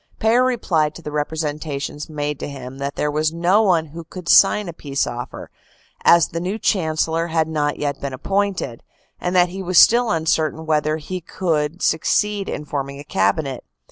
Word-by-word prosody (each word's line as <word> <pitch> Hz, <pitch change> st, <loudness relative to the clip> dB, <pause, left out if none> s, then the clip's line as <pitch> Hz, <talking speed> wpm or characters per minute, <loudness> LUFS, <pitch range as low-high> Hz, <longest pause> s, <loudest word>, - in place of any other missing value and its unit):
Payer 230 Hz, +3 st, +3 dB
replied 170 Hz, -12 st, +1 dB
to 170 Hz, -, -11 dB
the 150 Hz, -, -5 dB
representations 150 Hz, -1 st, -3 dB
made 150 Hz, -1 st, -3 dB
to -, -, -5 dB
him 135 Hz, -1 st, -9 dB
that 140 Hz, +1 st, -3 dB
there 150 Hz, -, -1 dB
was 155 Hz, +1 st, 0 dB
no 175 Hz, +5 st, +3 dB
one 175 Hz, -6 st, +3 dB
who 165 Hz, +2 st, -9 dB
could 175 Hz, +2 st, -10 dB
sign 200 Hz, +2 st, +5 dB
a 170 Hz, -, -5 dB
peace 140 Hz, -3 st, -2 dB
offer, 120 Hz, 0 st, -7 dB, 0.5 s
as 170 Hz, -1 st, +5 dB
the 165 Hz, -, -4 dB
new 185 Hz, +5 st, -3 dB
Chancellor 165 Hz, -4 st, 0 dB
had 160 Hz, -1 st, +1 dB
not 150 Hz, -2 st, -1 dB
yet 145 Hz, -2 st, -3 dB
been 140 Hz, -, -3 dB
ap 130 Hz, +1 st, -9 dB
pointed, 195 Hz, -11 st, -1 dB, 0.4 s
and 180 Hz, +1 st, -2 dB
that 180 Hz, -1 st, +5 dB
he 190 Hz, +2 st, -6 dB
was 185 Hz, -1 st, 0 dB
still 240 Hz, +4 st, +6 dB
uncertain 160 Hz, -2 st, 0 dB
whether 155 Hz, 0 st, +1 dB
he 180 Hz, +4 st, -6 dB
could 165 Hz, -1 st, -2 dB
suc 160 Hz, -, +2 dB
ceed 210 Hz, -1 st, 0 dB
in 150 Hz, -, -4 dB
forming 140 Hz, -1 st, -4 dB
a -, -, -8 dB
Cabinet. 130 Hz, +3 st, 0 dB
160 Hz, 190 wpm, -21 LUFS, 145-180 Hz, 0.5 s, still